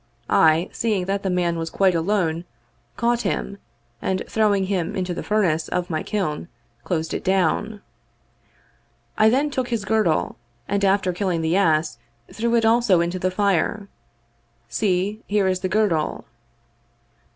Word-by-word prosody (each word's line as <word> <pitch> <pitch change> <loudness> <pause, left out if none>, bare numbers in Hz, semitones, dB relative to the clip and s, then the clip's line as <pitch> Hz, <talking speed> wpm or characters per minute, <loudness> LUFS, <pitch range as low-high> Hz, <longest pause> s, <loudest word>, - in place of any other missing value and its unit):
I, 160 +3 +4
seeing 210 -6 -1
that 195 +1 -1
the 195 - -2
man 175 -2 0
was 165 0 -3
quite 190 +1 +2
alone, 170 -1 0 0.5
caught 240 0 +1
him, 200 0 -3 0.4
and 190 0 -1
throwing 210 -3 +2
him 190 0 -2
into 185 -1 -2
the - - -5
furnace 180 -7 +1
of 180 0 -2
my 155 - -1
kiln, 175 -7 -3 0.4
closed 160 -3 -2
it - - -3
down. 195 +3 0 1.3
I 215 0 +5
then 280 +5 +1
took 260 -2 -2
his 230 -4 -2
girdle, 210 -7 +1 0.3
and 200 0 -1
after 195 -2 +2
killing 180 -3 -1
the 160 +2 +1
ass 155 -8 +2 0.3
threw 235 +1 0
it 230 -1 +3
also 225 -5 +4
into 175 +2 -1
the 185 - 0
fire. 200 +1 0 0.8
See, 195 - -1
here 205 -1 +1
is 185 -1 0
the 185 - -2
girdle." 185 -6 0
190 Hz, 150 wpm, -22 LUFS, 170-210 Hz, 1.3 s, I